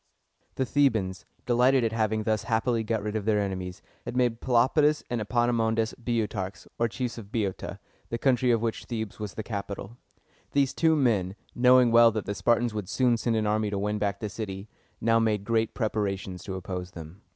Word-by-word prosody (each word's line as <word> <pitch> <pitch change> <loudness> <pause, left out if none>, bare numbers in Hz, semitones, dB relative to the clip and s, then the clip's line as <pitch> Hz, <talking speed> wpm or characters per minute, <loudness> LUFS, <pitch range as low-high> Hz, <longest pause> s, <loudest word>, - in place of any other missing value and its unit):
The 130 - 0
Thebans, 110 -10 +1 0.2
delighted 125 +1 +4
at 115 - +1
having 110 -1 0
thus 110 -1 0
happily 115 0 +1
got 110 -2 -1
rid 105 0 -3
of 105 -2 -2
their 110 -1 +2
enemies, 95 -2 -4 0.2
had 125 - -5
made 120 -2 +1
Pelopidas 145 +5 +3
and 120 -2 -1
Epaminondas 115 0 +1
Boe´o 115 -2 0
tarchs, 95 -2 -6
or 115 - +3
chiefs 120 +1 -4
of 105 -2 -12
Boeotia, 100 -5 -3 0.3
the 115 - -2
country 125 0 +2
of 115 -1 +2
which 115 -1 -2
Thebes 110 -4 -5
was 105 -2 -5
the 110 - -4
capital. 100 +1 -6 0.6
These 140 -2 +2
two 160 -1 +3
men, 105 -10 +1 0.2
knowing 125 -1 +5
well 115 0 +7
that 110 -2 -3
the 100 - -2
Spartans 120 +2 +1
would 105 -3 -4
soon 125 +1 +3
send 115 0 0
an 110 -1 +1
army 105 0 +1
to 100 - -2
win 105 +1 -1
back 100 -1 -1
the 105 - -3
city, 100 -2 -6 0.3
now 115 0 +3
made 110 -3 +1
great 115 -1 0
preparations 100 -5 -2
to 95 - -4
oppose 90 -1 -5
them. 85 +4 -10
110 Hz, 195 wpm, -27 LUFS, 100-120 Hz, 0.6 s, well